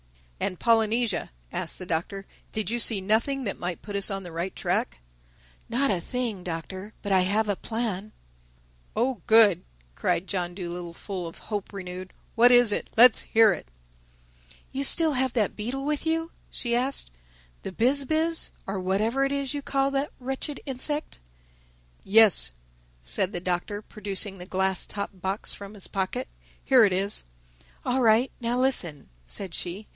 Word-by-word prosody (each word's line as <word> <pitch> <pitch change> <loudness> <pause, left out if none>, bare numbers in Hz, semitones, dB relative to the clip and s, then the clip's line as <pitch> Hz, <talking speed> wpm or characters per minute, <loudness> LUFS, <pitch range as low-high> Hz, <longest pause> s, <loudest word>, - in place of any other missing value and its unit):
"And 180 - -3
Polynesia," 225 -2 +1 0.2
asked - - -1
the 185 - -7
Doctor, 180 +4 -3 0.3
"did 215 0 -2
you 240 - -1
see 225 -3 +5
nothing 230 +8 0
that 200 - -4
might 175 -1 -4
put 205 -1 -7
us 200 -1 +3
on 195 -1 -4
the 175 - -9
right 170 +3 -4
track?" 65 - -2 0.7
"Not 255 +3 +2
a 180 -3 -1
thing, 235 -4 -3
Doctor—But 190 +5 -6
I 190 - +5
have 205 +4 +1
a 205 - 0
plan." 215 -2 -4 0.8
"Oh 245 +3 0
good!" 220 -6 +7 0.3
cried 170 - 0
John 175 -3 -3
Dolittle, 175 -2 -6
full 185 -3 -5
of 165 - -10
hope 205 -3 -5
renewed. 185 -2 -7 0.2
"What 240 +1 +6
is 245 -3 +6
it? - - -2
Let's 240 0 +8
hear 220 -3 +5
it." - - -8 1.0
"You 275 - -2
still 320 +2 +6
have 260 -1 0
that 220 -5 0
beetle 250 +6 -4
with 300 +2 -2
you," 325 +1 0 0.2
she 235 -2 -2
asked—"the - - -5
Biz 260 +8 +3
biz, 320 +2 0 0.2
or 195 0 -3
whatever 210 +8 0
it 275 - 0
is 280 -1 -2
you 290 - -3
call 275 0 0
the 275 +1 -1
wretched 270 +3 -4
insect?" 295 +3 -4 0.8
"Yes," 205 - +6 0.5
said 180 - -1
the 175 - -3
Doctor, 185 +4 -3
producing 200 -2 -3
the 180 - -9
glass 190 0 +1
topped 200 -2 -4
box 190 +3 -2
from 200 +1 -10
his 200 - -4
pocket, 200 +7 -3 0.4
"here 260 -3 +6
it 195 - +1
is." 195 +3 +1 0.6
"All 255 +1 +1
right. 230 +2 +4
Now 240 +1 0
listen," 195 - 0 0.2
said 190 - -4
she. 180 +6 -5
210 Hz, 160 wpm, -26 LUFS, 185-250 Hz, 1.0 s, Let's